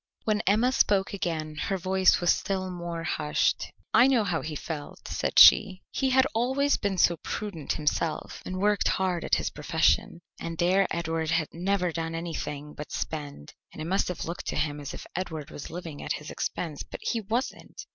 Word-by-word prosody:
When 215 -1 +1
Emma 220 +6 +4
spoke 200 -7 +2
again 160 -5 -2
her 195 +5 -1
voice 190 +1 +3
was 175 - +4
still 185 -1 -2
more 170 -2 -5
hushed. 150 -2 0 0.2
"I 245 - +7
know 255 -5 +3
how 175 -5 -1
he 155 -1 -5
felt," 150 0 -7
said - - -2
she. 190 -3 +8
"He 265 - 0
had 260 +1 +5
always 265 +5 +2
been 200 -2 -2
so 170 -1 +4
prudent 175 -4 -4
himself, 155 +1 -2
and 185 - -5
worked 205 +2 +2
hard 185 -3 0
at - - +2
his - - -2
profession, 160 +2 +1 0.2
and 165 -1 -5
there 185 +3 +3
Edward 165 -1 -2
had 165 -2 +1
never 180 +1 0
done 165 0 -3
anything 150 -3 -5
but 150 - -8
spend, 145 - -5 0.2
and - - -12
it 155 - -4
must 190 +4 +1
have 180 - -4
looked 170 +2 -6
to - - -2
him 150 -1 -1
as 145 -1 -6
if - - -9
Edward 160 -5 -4
was 145 - -8
living 165 -3 -7
at - - -2
his 150 - -7
expense, 155 -5 -3
but - - -8
he 230 - -1
wasn't." 230 +6 -4
175 Hz, 190 wpm, -27 LUFS, 160-195 Hz, 0.2 s, she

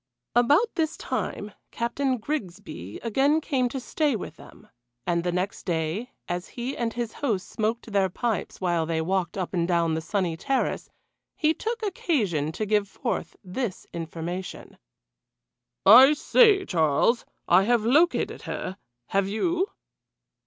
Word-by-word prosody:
About 290 - +4
this 320 -1 -1
time 205 +1 -3 0.2
Captain 255 +3 -1
Grigsby 195 - -5
again 270 +7 +3
came 265 -5 0
to 265 - -4
stay 290 +1 0
with 180 -6 -6
them. 140 - -16 0.4
And 170 -1 0
the 175 - 0
next 180 +3 -2
day, 170 +7 -2 0.2
as 175 0 -3
he 250 +3 -5
and 235 -1 -1
his 235 -1 -4
host 220 -10 -2
smoked 225 +1 -2
their 195 -2 +2
pipes 225 +4 -2
while 175 -3 0
they 165 -1 0
walked 180 +2 -1
up 185 -1 -3
and 170 -2 +1
down 170 -2 +2
the 160 - -1
sunny 175 0 -1
terrace, 270 - -1 0.5
he 310 0 +2
took 460 +5 -4
occasion 215 - 0
to 215 - -2
give 210 -1 +2
forth - - -4
this 190 +2 -4
information: 170 +2 -6 1.1
"I 255 +8 +9
say, 400 - +4
Charles 165 - +2 0.2
I 185 +3 +5
have 235 -1 +2
located 310 +9 +2
her 185 - -5 0.3
have 195 0 +1
you?" 345 - 0
210 Hz, 145 wpm, -26 LUFS, 175-265 Hz, 1.1 s, I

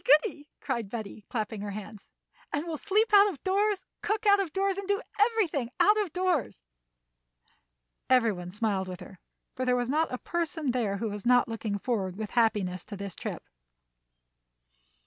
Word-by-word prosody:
goody!" 295 +1 +3
called 235 -7 -2
Betty, 215 -2 -6
clapping 220 -2 -3
her 205 - -4
hands. 210 0 -8 0.4
"And 290 +3 -1
we'll 320 -3 -4
sleep 425 +2 +1
out 405 0 +8
of 285 -9 -8
doors, 400 +1 +1 0.2
cook 430 +1 -1
out 405 -1 +6
of 375 -5 -1
doors, 390 +3 +1
and 395 - -6
do 400 0 +2 0.2
everything 405 - +2
out 415 - +6
of 390 -6 -3
doors." 350 - -1 1.5
Every 250 -3 +5
one 180 -2 -6
smiled 200 -1 -1
with 180 -1 -6
her, 190 - -11 0.4
for 255 - -2
there 250 -1 +3
was 245 0 -1
not 315 +3 +1
a 250 - -2
person 320 -2 -2
there 220 -5 0
who 220 +2 -2
was 205 -1 -6
not 245 0 +4
looking 225 -3 -3
forward 200 -5 -2
with 215 0 -5
happiness 205 -6 +1
to 205 - -7
this 200 -2 -5
trip. - - -6
250 Hz, 175 wpm, -29 LUFS, -, 1.5 s, out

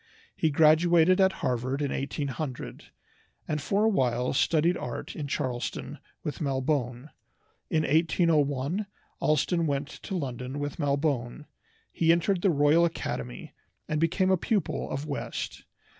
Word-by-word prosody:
He 160 - +1
graduated 165 +4 +5
at 190 0 +5
Harvard 130 +2 -1
in 145 -2 -1
1800, 140 -1 -4 0.6
and 150 -1 -1
for 200 +6 +1
awhile 125 - +1
studied 165 +4 +3
art - - -5
in 150 -3 -4
Charlestown 125 -3 -3 0.2
with 150 - -4
Malbone. 135 -1 -1 0.6
In 155 -1 +1
1801 155 +2 +1 0.3
Allston 160 +3 +2
went 140 0 -1
to 195 - -5
London 130 -2 -4
with 145 +2 -4
Malbone. 140 -2 -1 0.5
He 165 -1 +3
entered 175 +2 +2
the 195 - +3
Royal 150 +1 +4
Academy, 65 - -3 0.3
and 155 0 -1
became 185 +3 +2
a 190 - +4
pupil 205 +3 -1
of 140 - -3
West. 145 -2 -5
150 Hz, 130 wpm, -28 LUFS, 135-170 Hz, 0.6 s, graduated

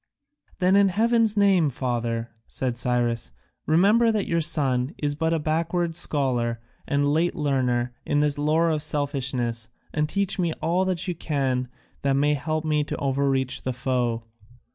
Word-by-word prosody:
"Then 185 +1 +3
in 200 0 +6
heaven's 225 +2 +2
name, 195 -6 +4
father," 120 -3 -2 0.2
said 125 -2 -2
Cyrus, 120 - -1 0.4
"remember 205 +9 +4
that 215 -2 0
your 170 0 0
son 140 -4 0
is 145 -1 -1
but 160 +2 -1
a 165 - +2
backward 165 +2 -1
scholar 130 -8 0 0.3
and 140 0 +1
a - - +2
late 160 +4 +1
learner 125 -5 0
in 145 - 0
this 145 -1 +1
lore 160 +3 +2
of 155 -1 -1
selfishness, 135 -6 -1 0.3
and 150 -1 0
teach 200 0 -1
me 170 -3 +1
all 180 +4 0
you 180 0 -1
can 135 -6 -1 0.3
that 140 -1 +1
may 145 +2 +2
help 155 +2 -2
me 150 -1 +1
to - - -4
overreach 135 -1 0
the 130 - -2
foe." 125 -2 -1
145 Hz, 160 wpm, -25 LUFS, 130-170 Hz, 0.4 s, in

